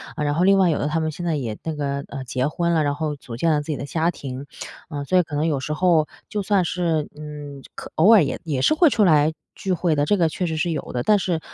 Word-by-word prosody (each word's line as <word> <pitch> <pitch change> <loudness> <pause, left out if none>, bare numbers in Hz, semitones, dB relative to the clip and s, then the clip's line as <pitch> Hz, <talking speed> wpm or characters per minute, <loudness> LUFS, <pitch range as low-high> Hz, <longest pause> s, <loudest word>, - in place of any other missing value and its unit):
呃， 150 - -2
然 145 0 +1
后 175 +3 +2
另 195 0 +5
外 190 -2 +4
有 155 - 0
的 145 - -1
他 160 +2 0
们 155 0 -1
现 175 +4 -6
在 165 -2 0
也 115 -7 -3
那 160 -1 -3
个， 140 -1 -3
呃， 135 -1 -6
结 130 +1 -1
婚 170 +3 -1
了， 160 -2 +2
然 145 0 0
后 150 -1 -2
组 125 -4 -9
建 165 +7 +1
了 150 -1 +2
自 145 - -12
己 - - -3
的 - - -5
家 165 +3 0
庭。 135 -4 -6 0.4
呃， 145 -3 -4
所 185 +6 +1
以 180 - +5
可 155 -2 -7
能 150 +2 +1
有 145 -4 0
时 150 +3 -3
候 165 -2 +3 0.2
就 210 - -2
算 200 -1 +2
是 165 -3 -1
嗯， 145 -2 -8
就 - - -16
可 - - -9
偶 195 +8 +6
尔 205 -7 +7
也 140 - -3
也 140 -5 -1
是 - - +4
会 315 +1 +5
出 220 -5 +2
来 155 -3 +4 0.2
聚 190 - -3
会 170 -2 +1
的， 145 0 +1
这 205 - +2
个 170 -3 +3
确 180 +4 -3
实 160 -2 -2
是 170 +2 0
有 155 - -4
的。 120 - -1
但 210 - +4
是， 175 -4 -1
155 Hz, 325 characters per minute, -22 LUFS, 145-175 Hz, 0.4 s, 尔